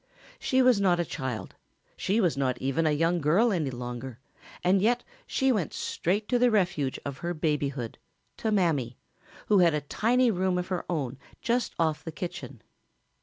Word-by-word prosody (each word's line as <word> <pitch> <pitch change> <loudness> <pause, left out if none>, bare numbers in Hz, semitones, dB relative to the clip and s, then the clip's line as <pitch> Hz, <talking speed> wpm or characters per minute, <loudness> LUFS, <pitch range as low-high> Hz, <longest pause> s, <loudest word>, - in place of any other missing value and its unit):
She 260 0 +2
was 250 -5 +5
not 180 -3 +3
a 175 - +1
child, 125 -10 -5 0.4
she 205 +4 0
was 175 -8 +2
not 130 -2 0
even 135 +5 0
a - - +3
young 165 +3 +1
girl 185 +11 +3
any 160 -6 0
longer, 125 0 -6 0.5
and 185 +2 +4
yet 240 +4 +2 0.2
she 265 0 +2
went 200 - -1
straight 205 +5 -1
to 245 - +2
the 250 0 +5
refuge 175 - +1
of 140 -1 -5
her 175 0 -3
babyhood 145 -6 -2 0.4
to 220 - -1
Mammy 155 - +1 0.5
who 205 -2 +4
had 170 -3 +5
a 150 - -1
tiny 235 - +2
room 185 -1 0
of 180 +1 -3
her 185 -2 -2
own 140 -6 -2 0.2
just 240 0 -1
off 160 -2 0
the 165 - -5
kitchen. 170 - -7
170 Hz, 175 wpm, -28 LUFS, 140-205 Hz, 0.5 s, was